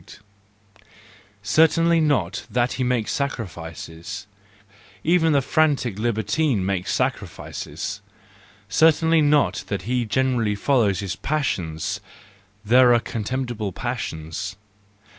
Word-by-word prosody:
Certainly 165 +8 +4
not 120 - 0
that 125 0 +1
he 130 - -2
makes 125 -3 0
sacrifices; 95 - -5 0.8
even 165 -1 +3
the 140 -2 +3
frantic 140 -7 +1
libertine 120 +1 0
makes 95 -2 -1
sacrifices. - - -3 0.7
Certainly 160 +7 +4
not 150 -1 +2
that 100 -2 -3
he 120 +2 0
generally 115 -1 +1
follows 105 -4 +2
his 95 -2 -3
passions; 90 - -2 0.7
there 120 +2 +6
are - - +4
contemptible 115 -2 -3
passions. 95 -5 -4
120 Hz, 95 wpm, -23 LUFS, 100-145 Hz, 0.8 s, there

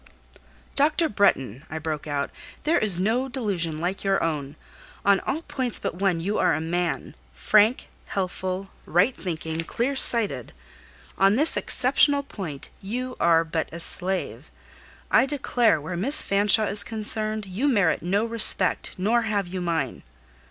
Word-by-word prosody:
"Dr. 310 +3 +2
Bretton," 135 - 0
I 160 - -6
broke 155 -1 -5
out, 145 -1 -3 0.3
"there 320 +3 +1
is 200 -5 +4
no 230 +8 -1
delusion 195 - -3
like 175 +4 -4
your 195 -1 0
own. 150 -3 -4 0.5
On 200 -1 +4
all 310 +5 -4
points 260 -6 -2
but - - -4
one 185 -2 -1
you 200 +6 -2
are - - +2
a - - -3
man, 170 +1 -3 0.2
frank, 215 - +2 0.2
healthful, 190 0 -4 0.2
right 190 +10 +2
thinking, 160 -2 -5
clear 250 +10 -3
sighted: 210 - +2 0.7
on 195 +2 +4
this 300 +6 +5
exceptional 285 -1 +2
point 165 - -8
you 250 +6 -5
are 165 -1 +3
but 160 0 -4
a 170 - -8
slave. 185 +2 0 0.6
I 260 - +4
declare, 245 - +1
where 160 +5 -6
Miss 270 - +4
Fanshawe 205 +2 +4
is 205 - +8
concerned, 215 -1 +1
you 195 +9 -3
merit 200 - +1
no 200 +6 -1
respect; 225 -5 +2
nor 220 +6 +1
have 210 -4 -2
you 185 +1 -6
mine." 165 -7 -3
195 Hz, 150 wpm, -24 LUFS, 170-230 Hz, 0.7 s, is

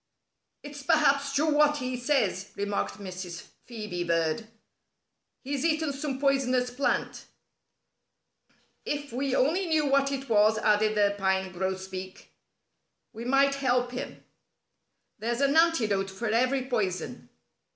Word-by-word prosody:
"It's 290 0 -8
perhaps 280 -1 +3
true 300 +2 +2
what 295 0 +4
he 255 -2 -3
says," 240 -7 0
remarked 200 0 -2
Mrs. 185 -3 -7 0.3
Phœbe 210 -7 -5
Bird. 165 +5 0 1.0
"He's 275 +1 -3
eaten 315 -2 +1
some 275 -1 -4
poisonous 255 -3 +1
plant." 260 +3 -1 1.6
"If 290 -4 -4
we 265 +1 -1
only 345 +8 +2
knew 315 -2 +2
what 275 0 +2
it 275 0 -4
was," 215 -1 +4
added 215 0 +2
the 205 -1 +3
Pine 190 -1 0
Grosbeak, 190 0 -5 0.8
"we 230 +1 -7
might 275 +2 +3
help 250 -3 0
him. 250 - -7 1.0
There's 235 +3 -2
an 280 +1 +3
antidote 225 -13 +3
for 195 +5 -6
every 255 +4 +1
poison." 190 -8 -3
250 Hz, 120 wpm, -28 LUFS, 200-280 Hz, 1.6 s, what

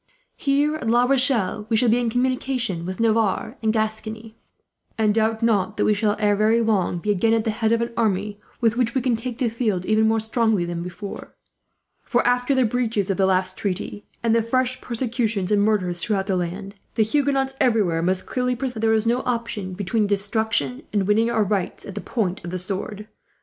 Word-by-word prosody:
"Here 290 +2 +1
at 270 - -5
La 240 +1 +4
Rochelle 250 -6 +2
we 225 - +2
shall 245 - +3
be 235 +2 +3
in 240 -1 0
communication 245 -7 -1
with 185 +3 -5
Navarre 225 +1 +1
and 220 -1 +2
Gascony; 220 0 -3 0.6
and 215 -2 +2
doubt 220 +1 0
not 215 -2 +1
that - - +2
we 215 - +4
shall, 205 0 +1
ere 210 -1 +2
very 215 +3 +3
long, 210 -6 +1
be 210 +5 -1
again 225 +3 +2
at 225 - +1
the 220 - 0
head 220 0 0
of 230 0 +2
an 235 - -5
army 205 -2 -1 0.2
with 230 -1 +3
which 240 -1 0
we 260 - +2
can 250 -3 +2
take 230 +1 -5
the 255 -2 +1
field, 220 -6 -1
even 215 +1 +3
more 225 0 +2
strongly 220 -4 +1
than 170 0 -4
before; 180 +3 -8 0.7
for 240 - 0
after 245 +2 +2
the 260 -1 +3
breaches 220 -4 0
of 195 - -2
the 190 -1 +3
last 185 0 0
treaty, 205 +1 -3 0.2
and 230 -1 +2
the 230 - +4
fresh 255 +2 0
persecutions 230 -5 -2
and 205 -1 +4
murders 185 -5 +1
throughout 200 -4 0
the 195 -1 0
land, 185 +3 -4 0.2
the 225 - +4
Huguenots 270 +2 +1
everywhere 205 -9 +2
must 185 +2 0
clearly 250 0 -1
perceive 255 0 -2
that 220 - -7
there 225 0 +2
is 220 0 +1
no 240 +2 +2
option 230 -6 -2
between 205 +3 0
destruction, 200 - 0
and 205 -2 +1
winning 220 +3 +2
our 220 -2 +2
rights 200 -2 -2
at 200 - -7
the 205 - -5
point 195 -6 -2
of 175 - -5
the 185 - -3
sword. 200 +3 -5
220 Hz, 210 wpm, -23 LUFS, 200-235 Hz, 0.7 s, La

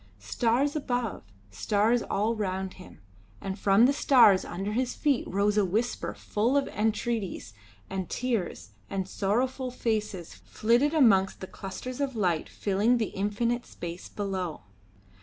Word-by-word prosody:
Stars 235 - 0
above, 245 -7 -2 0.3
stars 210 - +1
all 215 +3 0
round 190 -3 -3
him; 180 - -14 0.4
and 195 +1 -5
from 200 +4 +5
the 275 - +4
stars 245 -9 +5
under 195 +4 -4
his 245 +3 -1
feet 285 -4 +1
rose 205 +2 +1
a - - +4
whisper 215 +6 -1
full 235 +7 0
of 280 - +1
entreaties 215 - -2 0.3
and 190 -2 -4
tears, 195 - -2 0.2
and 190 -1 -2
sorrowful 250 +7 -1
faces 215 -7 -3
flitted 245 +8 +1
amongst 200 -10 +4
the - - -6
clusters 220 +8 -7
of 270 -3 -1
light 180 -7 0
filling 210 +5 +1
the 220 -3 -1
infinite 230 +5 -1
space 170 +1 -7
below. 190 -5 -3
210 Hz, 140 wpm, -28 LUFS, 190-245 Hz, 0.4 s, from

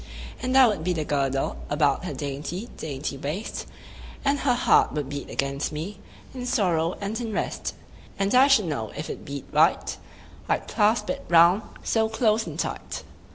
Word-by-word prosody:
And 255 +1 +1
I 265 - +9
would 205 -8 -1
be 180 +1 +1
the 155 -3 -2
girdle 135 -2 0
About - - +2
her - - -3
dainty 150 - -4
dainty 140 -2 -4
waist, 155 +11 -4 0.6
And 280 0 +2
her 255 -3 +2
heart - - +4
would 145 -3 -3
beat 145 0 -5
against 140 +1 -2
me, 170 +7 -5 0.3
In 250 -1 -5
sorrow 180 - +1
and 210 +4 -3
in 230 -2 -3
rest: - - -3 0.4
10 195 - +1
And 200 - 0
I 260 +2 +7
should 270 -8 +5
know 115 -10 -3
if - - -4
it - - -8
beat 140 -1 -6
right, - - +3 0.5
I'd - - 0
clasp 210 +2 +2
it 275 0 -5
round 170 +4 +6 0.2
so 220 -1 +1
close 220 -1 +2
and - - -6
tight. - - -4
190 Hz, 180 wpm, -25 LUFS, 145-225 Hz, 0.6 s, I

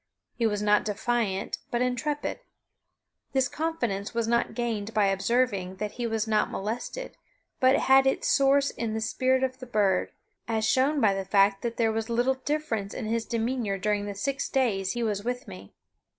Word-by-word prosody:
He 230 - +1
was 210 -1 -1
not 210 0 +4
defiant, 215 -2 -1
but 240 +1 0
intrepid. 290 +4 -2 0.9
This 265 -1 +3
confidence 240 -11 -3
was 230 -1 0
not 235 +1 +1
gained 225 -3 -3
by 210 -2 +4
observing 195 -1 0
that 210 +2 -4
he 240 -1 -3
was 225 0 -1
not 215 -1 +2
molested, 230 - -5 0.4
but 260 -1 +5
had 270 0 +5
its 265 - +1
source 275 0 +4
in 225 -2 -3
the - - -1
spirit 260 +3 +1
of 260 0 -2
the 255 - -9
bird, 200 -5 +1 0.4
as 220 -1 0
shown 270 +5 +2
by 205 -3 +4
the 195 0 -2
fact 195 0 +3
that 235 -1 -3
there 225 -2 +2
was 225 +1 -3
little 240 +3 +2
difference 265 -10 -2
in - - -4
his 225 +1 -1
demeanor 230 -3 -1
during 205 +1 -1
the 205 - -5
six 275 +7 -2
days 205 -8 +1
he 240 -1 -2
was 205 -2 -1
with 245 +1 -3
me. 95 +1 -10
230 Hz, 180 wpm, -27 LUFS, 205-255 Hz, 0.9 s, but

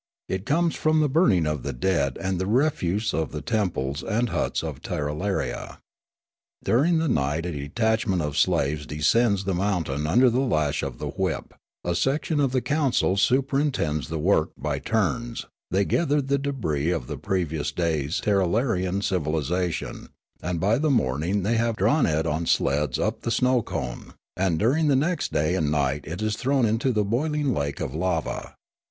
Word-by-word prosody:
It 95 +1 -3
comes 165 +3 +2
from 155 0 +2
the 150 - +3
burning 130 - +3
of 75 -3 -1
the 70 +1 -4
dead 70 -1 0
and 95 +3 -2
of 90 - -2
the 95 - -1
refuse 110 - +1
of 80 +1 -1
the 75 - -5
temples 90 - -1
and 115 +2 0
huts - - -1
of - - -5
Tirralaria. 75 +7 -3 0.9
During 155 +8 +3
the 160 0 +1
night 75 - 0
a 90 - -2
detach 110 +11 -1
ment 95 -3 +1
of 75 -1 -3
slaves 75 +2 +1
descends 100 +7 +2
the 95 0 -1
mountain 85 -6 -1
under 125 +10 +5
the 125 - +1
lash 75 - +1
of 65 -3 -4
the - - -4
whip; - - -3 0.3
a 85 - 0
section 145 - 0
of 140 -3 +2
the 130 -1 +1
council 145 -10 +1
superintends 130 - +1
the 80 - -2
work 80 0 +2
by 70 0 -2
turns; 115 - -1 0.2
they 95 +3 +2
gather 150 - +1
the 140 0 0
debris 100 - -1
of 85 -8 -1
the - - -5
previous 85 -6 -1
day's 80 -3 -1
Tirralarian 100 -1 +1
civilisation, 85 0 -2 0.3
and 90 -1 -2
by 105 +8 +2
the 155 +1 +1
morning 90 - +1
they 115 +4 +1
have 115 0 +1
Sneekape 100 - 0
159 145 +7 +3
drawn 75 -1 +2
it 80 - -1
on 80 +1 -1
sleds 70 -1 +1
up - - -1
the - - -3
snow 125 +1 +2
cone; 60 - -5 0.2
and 90 -3 +1
during 140 - +2
the 140 - +4
next 160 +6 0
da)^ 75 +3 +1
and 80 -5 +1
night 70 -1 0
it 90 +6 -4
is 110 0 0
thrown 135 -1 +2
into 115 +4 +1
the 105 -3 +1
boiling 145 +5 0
lake 70 -4 -2
of 65 - -3
lava. 85 0 -2
95 Hz, 185 wpm, -25 LUFS, 75-125 Hz, 0.9 s, under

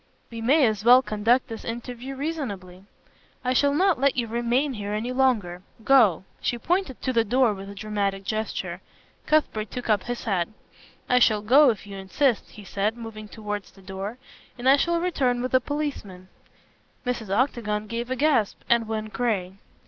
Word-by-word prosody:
"We 230 -1 -6
may 275 +5 +4
as 215 -2 0
well 250 +3 +7
conduct 230 +5 +1
this 225 -3 -7
interview 245 +3 -6
reasonably." 205 - -5 0.6
"I 255 - +2
shall 285 +3 +3
not 370 -2 +3
let 275 -1 +2
you 240 - +1
remain 240 +5 0
here 205 -2 -4
any 225 +4 -2
longer. 230 -9 +1 0.2
Go." 220 -9 +5 0.2
She 240 - -1
pointed 340 0 -1
to 260 - 0
the 230 -1 +3
door 245 +1 +2
with 195 0 -8
a 200 - -9
dramatic 200 -2 -2
gesture. 215 +2 -3 0.5
Cuthbert 260 -9 +1
took 245 -2 -6
up 205 -3 +1
his 245 0 -4
hat. 185 -6 0 0.6
"I 250 - +4
shall 215 -3 +3
go 270 +6 +6
if 215 -3 -2
you 200 -1 -8
insist," 220 +6 0
he 210 - -12
said, 205 +3 -2
moving 220 -2 -8
towards 210 -2 -6
the 195 - -18
door, 195 +4 -6 0.4
"and 245 +1 -3
I 270 - +8
shall 340 +4 +1
return 270 -9 0
with 255 - -3
a 255 - +5
policeman." 250 -11 -5 0.8
Mrs. 240 -4 -3
Octagon 215 -2 0
gave 235 +3 -4
a 260 - -1
gasp 270 -7 +2
and 235 -1 +3
went 215 -1 -4
gray. 200 -6 -1
230 Hz, 180 wpm, -25 LUFS, 210-260 Hz, 0.8 s, I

